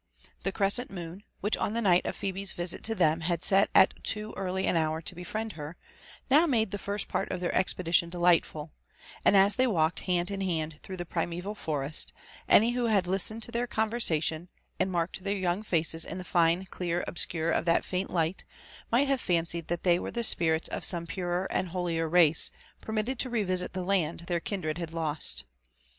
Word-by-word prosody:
The 195 - -2
crescent 200 +5 +2
moon, 175 0 -8 0.2
whidh 210 - +1
on 205 - -1
the 230 - -1
night 180 -4 +3
of - - -3
Phebe's 195 0 -2
visit 175 0 -4
to 225 0 0
them 160 -3 +2
had 170 0 -1
set 195 +1 +4
al - - +9 0.2
too 215 0 -3
early 190 0 -2
an - - +1
hour 160 -1 0
to 165 - -4
befriend 215 +5 -5
her, 150 +2 -8 0.5
now 300 +5 +5
made 225 -8 +1
tbe 205 - -4
first 200 +1 -3
part - - -2
of - - -3
their 175 - -2
expedition 175 -2 +1
delightful 170 -3 +1 0.4
^, - - -16
and 200 - +5
as 195 +2 +4
they 255 0 +3
walked 165 -7 +1
hand 180 -1 -1
ifr 195 -1 -3
hand 160 -4 -3
through 190 - -8
the 175 - -5
primeval 175 +4 -3
forest, 150 -6 -3 0.4
any 230 +3 +6
who 245 0 -1
had 205 -5 +2
listened 195 +5 +6
to 235 - -4
their 240 +1 -1
eovyersaf 220 -9 0
tion, 165 +3 -3 0.3
and 190 - 0
marked 175 +1 -2
their 200 +1 -1
young 185 +1 -1
faces 165 -5 0
in 180 - -5
the 185 - -6
fine 170 +1 +2
ckaa* 175 -1 -2
odMcnre 165 -1 0
of 170 - 0
Aat 165 - +2
faint 185 +1 -3
light, 165 +1 -1 0.5
might 260 +5 +3
have 270 -2 0
fancied 170 -2 -1
that 175 0 -3
they 175 -2 +4
w«re - - -5
ttie 235 -2 +3
q^rrits 160 -1 0
eC - - -5
some 170 -2 0
purer 175 +1 -2
and 185 - -1
holier 170 -2 -2
race, 165 -2 +5 0.3
permitted 220 +3 -3
torevisit 200 -9 -1
the 185 -1 -4
(and 170 -4 0
tbetr 170 -1 -2
kindt 195 -5 -4
ed 155 +1 -2
had 165 -2 -6
lost. 150 - -1
180 Hz, 205 wpm, -28 LUFS, 165-200 Hz, 0.5 s, al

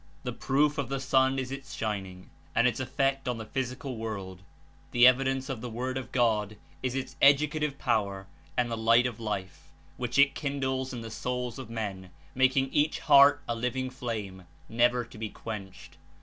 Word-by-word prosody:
The - - -3
proof 145 +2 +1
of 135 -3 -2
the 135 0 -2
sun 130 0 +2
is 130 -1 -3
its 135 0 -7
shining 95 -4 -4 0.2
and 115 - +4
Its 125 - -1
effect 135 +1 0
on 125 -1 -1
the 110 - -6
physical 130 +2 -4
world; 100 -5 -5 0.5
the 120 0 +5
evidence 135 +1 +4
of 130 -6 -4
the 125 - -5
Word 125 +3 -3
of 130 -1 -5
God 110 -4 +1 0.2
is 130 0 -2
Its 135 0 -4
educative 150 +1 +4
power 100 -6 -1 0.3
and 120 -1 +1
the - - 0
light 115 +2 +4
of 120 -3 -3
Life, 95 -9 -5 0.3
which 125 +1 -3
It 140 0 +6
kindles 130 -2 -2
In 120 -2 -5
the 115 -1 -7
souls 125 +1 -3
of 130 - -8
men, 100 -5 -5 0.2
making 130 +1 +2
each 150 +1 +2
heart 145 -1 +6
a 120 - 0
living 125 +2 -2
flame, 105 -8 -5 0.2
never 120 +1 +2
to 115 - -14
be 110 -1 -3
quenched. 100 -4 -8
125 Hz, 180 wpm, -29 LUFS, 110-135 Hz, 0.5 s, It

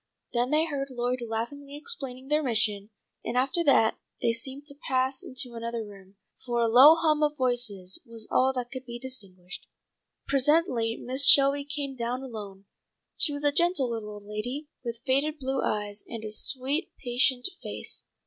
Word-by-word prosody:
Then 240 +1 +1
they 305 +2 +3
heard 280 -4 -3
Lloyd 250 0 -2
laughingly 240 +5 -5
explaining 270 - -3
their 300 +2 +2
mission, 215 -6 0 0.3
and 245 - -3
after 270 +7 +1
that 225 -6 +4 0.2
they 230 - +2
seemed 265 +5 -4
to 280 -1 -7
pass 260 0 +1
into 255 -1 -2
another 230 -1 -4
room, 195 -1 -14 0.3
for 240 -2 -1
a 230 - +3
low 260 +8 +9
hum 310 -2 +2
of 300 0 +1
voices 235 -8 -1
was 230 -3 -8
all 260 +1 +4
that 245 -1 -4
could 260 -1 -6
be 240 -2 -7
distinguished. 195 -8 -8 0.6
Presently 270 -5 +2
Mrs. 265 +3 +4
Shelby 280 0 +7
came 280 -1 -4
down 245 +2 -3
alone. 205 -6 -8 0.5
She 315 - +3
was 285 0 -5
a 290 - +4
gentle 340 -5 +2
little 220 -2 -4
old 205 -1 -9
lady, 245 +8 -5
with 235 0 -5
faded 280 +4 +1
blue 265 -1 -2
eyes, 210 -1 -2
and 230 -2 -7
a 215 - -5
sweet 275 - 0
patient 245 0 +1
face. - - -3
255 Hz, 170 wpm, -27 LUFS, 230-280 Hz, 0.6 s, low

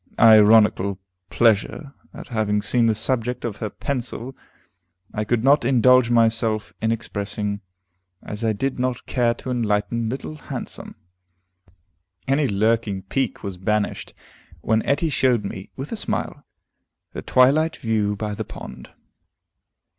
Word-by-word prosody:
Ironical 105 -3 +5 0.3
pleasure 120 +5 +1 0.2
at - - -11
having 105 -3 0
been 120 -2 +3
the 110 - +2
subject 125 +2 -1
of 110 -4 -4
her 110 - -4
pencil 125 +1 -4 0.8
I 105 - -1
could 115 +1 0
not 140 +1 +4
indulge 125 0 +4
myself 115 -2 +1
in 110 - +1
expressing, 105 -2 -3 0.6
as 105 +2 -6
I 110 - +2
did 130 +5 -2
not 125 -1 -2
care 120 -2 +1
to 130 - -6
enlighten 115 0 -1
Little 135 +5 -6
Handsome. - - -7 1.3
Any 140 +1 +2
lurking 105 -1 0
pique 135 - -2
was 100 -3 -5
banished 105 +3 -2 0.5
when 110 0 +1
Etty 145 +4 +1
showed 125 -5 +2
me, 95 -1 -7
with 135 +2 -7
a - - -2
smile, - - -3 0.7
the - - -5
twilight 150 +6 +3
view 105 -3 0
by 105 +1 -4
the - - -4
pond. 65 -1 -10
115 Hz, 130 wpm, -22 LUFS, 105-125 Hz, 1.3 s, Ironical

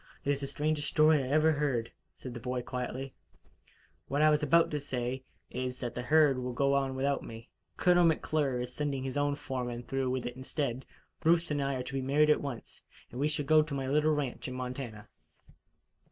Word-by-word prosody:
"It 140 - +2
is 140 0 -1
the 140 - -3
strangest 150 +1 -1
story 155 0 +5
I 130 - -4
ever 155 +3 +4
heard," 140 -6 -1 0.2
said 130 - -8
the 120 - -6
boy 125 +1 -3
quietly. 125 +2 -4 0.9
"What 140 +3 +1
I 155 - +6
was 150 0 +2
about 165 +2 +4
to 150 - -1
say, 130 -2 -3 0.3
is 125 0 -3
that 120 -2 -4
the 125 - -4
herd 145 0 +4
will 125 0 -3
go 140 +2 +2
on 135 -1 +1
without 140 +1 0
me. 115 +1 -10 0.3
Colonel 175 -1 +4
McClure 150 -5 +1
is 125 0 -5
sending 140 -2 -2
his 130 -1 -4
own 145 0 +1
foreman 125 -4 -4
through 135 +1 -1
with 130 -1 -2
it 120 - -4
instead. 130 -1 -3 0.4
Ruth 170 0 +3
and 145 -1 0
I 140 0 0
are 125 - -3
to 130 - -8
be 135 - -1
married 150 +3 +4
at - - +2
once, 140 -5 -7 0.3
and 125 - -7
we 145 - +2
shall 150 -1 -2
go 155 +2 +6
to 150 -2 -4
my 135 -1 -2
little 150 +2 +3
ranch 140 -4 -3
in 130 - -5
Montana." 125 -4 -6
135 Hz, 210 wpm, -31 LUFS, 125-150 Hz, 0.9 s, I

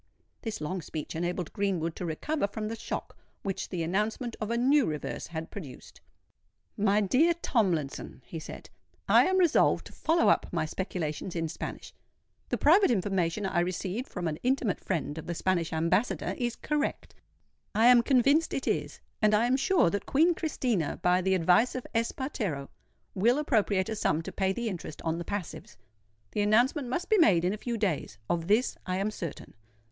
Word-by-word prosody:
This 220 -2 -4
long 180 +4 -3
speech 155 -1 -6
enabled 175 0 -3
Greenwood 180 -5 -1
to 180 - -4
recover 240 - -1
from 215 +1 -4
the 225 - -3
shock - - -5 0.3
which 195 -2 -3
the 175 -3 -2
announcement 210 +7 -1
of 215 - -2
a 235 - 0
new 270 +3 +4
reverse 150 -1 -4
had 160 -1 -6
produced. 145 -11 -10 0.7
"My 205 0 +2
dear 295 - +3
Tomlinson," 175 - -1
he 165 - -6
said, - - -10 0.4
"I - - +6
am 375 0 +2
resolved 350 -4 +3
to - - -12
follow 330 +1 +2
up - - +2
my 165 -3 0
speculations 170 0 -4
in 165 -1 -1
Spanish. - - -7 0.6
The - - 0
private 365 +7 +5
information 195 -3 0
I 185 -2 0
received 185 +7 -2
from 180 -3 -3
an 155 -1 -3
intimate 250 -6 0
friend 160 -4 -2
of - - -9
the 170 - -3
Spanish 175 -2 0
Ambassador 165 +8 0
is 240 -1 -2
correct—I 295 -6 -3
am 245 -1 +8
convinced 275 +6 +3
it 270 - -3
is; - - -2 0.2
and 215 -1 +4
I 220 +3 +3
am 250 +2 +3
sure 275 - +3
that 205 0 -3
Queen 325 +5 +4
Christina, 250 - -1
by 180 +1 +4
the 190 +1 +2
advice 180 +8 +3
of 255 - -4
Espartero, 225 - -2 0.4
will 230 +7 +3
appropriate 210 -9 +1
a 220 - -3
sum 165 -6 0
to - - -6
pay 190 -1 0
the 235 +4 -3
interest 175 -6 -6
on 165 0 -1
the 170 - -5
passives. 200 -3 -6 0.5
The 210 - -1
announcement 245 +7 +3
must 345 +9 -2
be 435 - +4
made 180 - +5
in 185 - +1
a - - -2
few 235 +2 -3
days. 170 - -2
Of 170 -1 -1
this 220 +6 +2
I 185 0 -1
am 200 +2 -1
certain. 170 -7 -7
200 Hz, 180 wpm, -29 LUFS, 170-245 Hz, 0.7 s, am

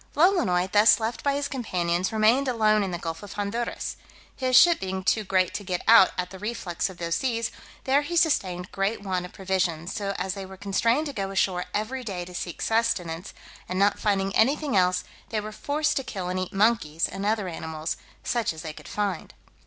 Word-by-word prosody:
Lolonois, 295 - +3
thus 210 +1 +6
left 225 +1 -3
by 280 -1 +2
his 285 0 -1
companions, 180 -9 -1
remained 225 +5 +3
alone 215 -4 +3
in 195 - -1
the 175 - -3
gulf 165 -1 -5
of 205 -1 -9
Honduras. 210 +4 -3 0.4
His 255 -1 0
ship 335 +6 +7
being 190 0 -3
too 215 +3 +2
great 185 -2 +1
to 205 - -4
get 180 -2 -3
out 225 -4 +8
at 180 0 -2
the 190 - -9
reflux 200 -5 -3
of 185 - -11
those 170 -1 -2
seas, 230 -1 -1 0.3
there 270 +2 +3
he 335 +4 -4
sustained 185 - +1
great 200 +2 -1
want 185 -2 -2
of - - -19
provisions, 185 -2 -1
so 200 -3 -3
as 190 - -2
they 195 -1 -6
were 190 0 -10
constrained 230 +9 +1
to 285 - -5
go 195 -5 -3
ashore 190 -2 0
every 240 +5 -2
day 185 -6 -4
to 180 - -11
seek 175 -1 -5
sustenance, 195 -7 0 0.4
and 185 - -2
not 200 +1 +3
finding 195 -2 0
anything 275 +2 +2
else, 180 -1 +3 0.3
they 220 - -1
were 210 +1 -6
forced 300 +6 -1
to 270 - 0
kill 190 -7 -5
and 185 0 -1
eat 185 - -3
monkeys, 195 -7 +2
and 195 - -6
other 210 -1 0
animals, 160 -1 -4 0.3
such 235 -7 0
as 160 - -9
they 155 -1 -5
could - - -13
find. 200 -4 -3
200 Hz, 205 wpm, -26 LUFS, 180-230 Hz, 0.4 s, out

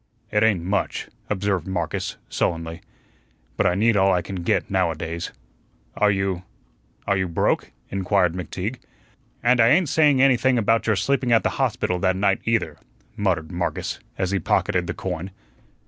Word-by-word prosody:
"It 105 - +2
ain't 105 -6 +3
much," 100 +3 -2 0.2
observed 100 -4 -1
Marcus, 85 -4 -3
sullenly. 80 0 -2 0.7
"But - - +2
I 90 - +2
need 110 +3 +3
all 95 -1 +4
I 90 -2 +1
can 95 +2 -6
get 85 - 0
now - - +2
a 80 - -3
days." 85 +2 -5 0.6
"Are 105 - +3
you 95 -2 0 0.6
are 100 - +2
you 95 -1 0
broke?" 85 - 0 0.2
inquired 95 -2 +1
McTeague. 95 +6 -4 0.7
"And 125 0 +4
I 115 - +6
ain't 165 +5 +4
saying 145 -4 +4
anything 130 -1 +4
about 115 +1 +2
your 110 - +3
sleeping 125 +5 0
at 115 - +4
the - - +2
hospital 105 -7 0
that 95 -1 +2
night, 95 0 +1
either," 110 -10 0 0.4
muttered 90 -6 -1
Marcus, 90 0 -3 0.2
as 95 -1 -1
he 100 - +1
pocketed 90 +1 +1
the 85 - -3
coin. 90 0 -4
95 Hz, 165 wpm, -23 LUFS, 90-110 Hz, 0.7 s, I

